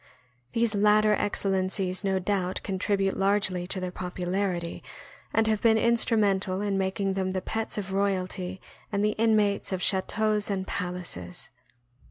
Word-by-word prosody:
These 230 -1 +1
latter 210 +1 +4
excellencies 190 -2 0
no 195 -1 +1
doubt 185 -1 -1
contribute 195 0 0
largely 195 -2 +1
to 190 - -1
their 185 -1 -3
popularity, 180 -1 -3 0.5
and 225 - +2
have 215 -1 +1
been 225 -1 +5
instru 235 0 +3
mental 195 -2 +1
in 205 -1 -1
making 195 0 0
them 190 -1 -1
the 190 - 0
pets 225 +3 -3
of 195 -2 -4
royalty 190 -1 -1 0.3
and 205 0 +1
the 210 - +2
inmates 210 -3 +2
of 185 - -1
chateaus 210 +2 +1
and 190 -2 -1
palaces. 175 - -5
195 Hz, 145 wpm, -27 LUFS, 185-210 Hz, 0.5 s, been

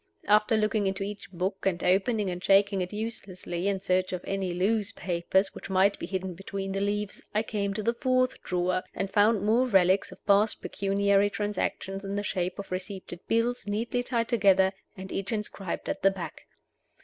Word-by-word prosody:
After 210 +2 +4
looking 215 -1 +1
into 190 0 -1
each 205 +1 -6
book, 190 +2 -3
and 180 -3 0
opening 195 +2 +2
and 180 +1 -6
shaking 200 0 +4
it 180 - -3
uselessly, 195 -4 -4
in 200 -1 +1
search 185 -1 +1
of 180 - -4
any 195 -2 -2
loose 205 +4 +1
papers 185 +2 0
which - - -9
might 195 +1 +3
be - - -5
hidden 190 -1 -3
between 195 +2 -5
the 195 0 -2
leaves, 205 0 -2
I 215 - +3
came 200 -3 -2
to 215 - -2
the 235 - +2
fourth 255 +1 +1
drawer, 180 0 0
and 195 0 -2
found 210 0 +4
more 230 +5 +3
relics 190 -3 +3
of - - -15
past 205 +2 +4
pecuniary 200 0 +2
transactions 205 -1 -3
in 195 0 -4
the 205 - -1
shape 185 -3 -2
of 200 - -7
receipted 185 -1 -5
bills, 230 0 0
neatly 230 +4 -1
tied 235 -2 -1
together, 195 -5 +4 0.2
and 190 0 -8
each 195 +3 -3
inscribed 210 -4 -4
at - - -3
the 195 - +6
back. 175 -5 -7
195 Hz, 185 wpm, -28 LUFS, 190-210 Hz, 0.2 s, the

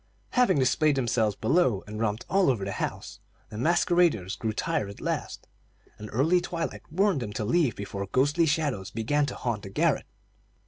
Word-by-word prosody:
Having 245 - +3
displayed 140 +3 +3
themselves 115 -5 +1
below 125 - +2
and 105 +1 -7
romped 110 0 -1
all 195 -4 +3
over 110 -7 0
the 100 - -3
house, - - -5 0.3
the 105 - -8
masqueraders 170 - +2
grew 110 - -2
tired 150 - -1
at 100 - -10
last, - - -4 0.5
and 105 0 -8
early 160 +9 +3
twilight 170 -1 -4
warned 190 -1 +2
them 105 -3 -5
to 105 - -3
leave 140 - +2
before 100 0 -5
ghostly 145 - +2
shadows 145 - -1
began 140 +6 0
to - - -5
haunt 115 -4 -2
the 100 - -8
garret. 95 - +1
130 Hz, 175 wpm, -27 LUFS, 105-165 Hz, 0.5 s, Having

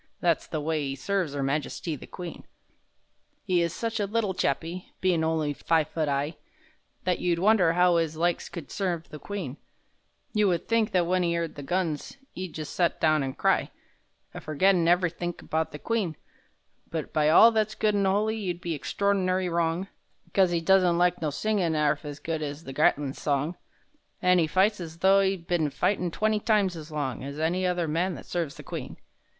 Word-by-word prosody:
(That's 170 -3 +1
the 155 - -3
way 155 +1 -1
'e 135 -1 -3
serves 175 0 -1
'Er 140 - -1
Majesty 150 +3 -2
the 135 - -11
Queen!) 175 -2 -8 1.0
'E 180 -2 +3
is 170 -1 0
such 225 +5 -3
a 205 - 0
little 210 -2 0
chappie, 170 +2 -2
Bein' 180 -3 +2
only 160 -2 0
five 160 +1 +1
foot 155 -3 -1
'igh, 140 +3 -1 0.7
That 180 -1 0
you'd 175 -1 +1
wonder 185 -3 +4
how 180 0 +4
'is 160 -2 -1
likes 175 +1 0
could 165 -5 -8
serve 175 -4 -2
the 150 - -9
Queen; 175 -9 -5 0.8
You 210 -2 +3
would 175 -3 0
think 230 -1 +2
that 180 -2 +3
when 180 +1 +1
'e 170 -1 +1
'eard 170 -1 -2
the 145 - -8
guns 170 - -2 0.2
'E'd 185 -2 -6
just 155 -2 -5
set 170 -2 +1
down 155 -1 +3
an' 135 -1 -3
cry— - - +2 0.6
A - - -7
forgettin' 170 +3 +2
ev'rythink 175 0 0
about 160 0 -1
the 150 - -7
Queen; 200 -3 -1 0.7
But 160 -2 -4
by 155 -1 +3
all 225 +8 +8
that's 215 -1 0
good 215 -1 +1
an' 200 -1 +2
holy, 210 +3 +1
you'd 180 -5 -3
be 170 -1 -3
extraord'ny 185 +2 0
wrong, 170 +2 0 0.5
'Cos 190 -3 +4
'e 170 -1 0
doesn't 180 -1 +4
like 175 0 +2
no 155 - 0
singin' 175 +1 0
'arf 150 0 +1
as 145 -1 -6
good 160 -1 -3
's 145 +1 -5
the 135 - -8
Gatlin's 140 0 +1
song, 145 +4 0 0.6
An' 180 0 +4
'e 160 - +2
fights 195 +6 +2
as 165 -1 -7
though 195 +3 +5
'e'd 190 -3 0
been 170 -3 +1
a - - -3
fightin' 180 +4 0
twenty 215 +4 +1
times 205 -4 +2
as 155 -1 -8
long 140 -5 -3
As 140 +1 -6
any 180 +4 +1
other 175 -2 0
man 170 +4 0
that - - -10
serves 165 -5 -3
the - - -10
Queen! - - -6
170 Hz, 195 wpm, -27 LUFS, 155-190 Hz, 1.0 s, all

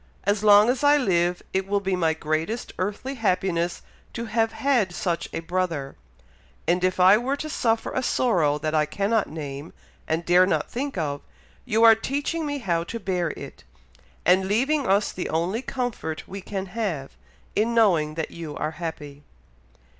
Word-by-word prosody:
As 205 +1 0
long 205 0 +7
as 250 +2 0
I 290 +1 +6
live, 175 -8 +1
it 190 0 0
will 200 0 +1
be 190 -1 -1
my 165 -3 +1
greatest 160 +9 -2
earthly 210 +8 -3
happiness 185 -7 0 0.3
to 235 - -4
have 225 0 +1
had 240 -10 +1
such 170 -3 -2
a - - -4
brother; 165 -5 -2 0.7
and 180 +2 +2
if 185 0 +1
we 180 - +4
are 235 +8 +5
to 310 - -5
suffer 225 -4 0
a 260 - -1
sorrow 175 - +2
that 155 +1 -3
I 155 -1 +2
cannot 200 +6 0
name, 145 -1 -7 0.3
and 165 +1 -1
dare 180 +2 +5
not - - -1
think 275 -1 -3
of, 145 -4 -2 0.4
you 225 -2 +2
are 225 -1 +10
teaching 290 +7 -2
me 290 0 -2
how 175 -10 -1
to 230 - -5
bear 180 -4 -1
it, - - -10 0.6
and 185 +2 +4
leaving 265 +7 +1
us 200 +2 +2
the 180 - -4
only 175 +8 -1
comfort 245 -13 -4
we 195 +1 -7
can 195 0 -4
have, 180 -12 -3 0.4
in 230 +2 +1
knowing 170 -9 +3
that 160 -1 -3
you 165 -3 -7
are 155 - -2
happy." 150 -4 -7
190 Hz, 175 wpm, -25 LUFS, 165-230 Hz, 0.7 s, are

